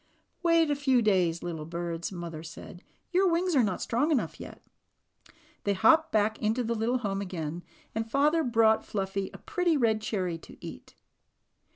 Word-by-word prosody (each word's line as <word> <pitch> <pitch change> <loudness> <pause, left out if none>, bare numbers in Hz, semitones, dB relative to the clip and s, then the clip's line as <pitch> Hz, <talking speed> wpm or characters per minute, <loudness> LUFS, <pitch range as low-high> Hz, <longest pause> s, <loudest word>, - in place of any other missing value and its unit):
"Wait 335 -3 +3
a - - +2
few 270 -3 +3
days, 185 -7 +2
little 165 -3 -4
birds," 170 +1 -4
Mother 170 -3 -6
said. 165 +2 -10 0.3
"Your 370 0 +3
wings 345 0 +1
are 265 - +6
not 200 -5 -1
strong 245 +7 +1
enough 295 -6 0
yet." - - -10 1.0
They 200 -1 +1
hopped 320 - +4
back 215 0 +1
into 220 +4 +1
the 230 0 -1
little 230 +3 0
home 200 -5 -2
again, 170 -3 -4 0.3
and 225 +1 -3
father 300 +6 +3
brought 225 -3 +3
Fluffy 195 -1 -3
a - - -10
pretty 350 -3 0
red 220 -4 +2
cherry 185 -6 -2
to - - -14
eat. - - -10
220 Hz, 170 wpm, -28 LUFS, 180-280 Hz, 1.0 s, are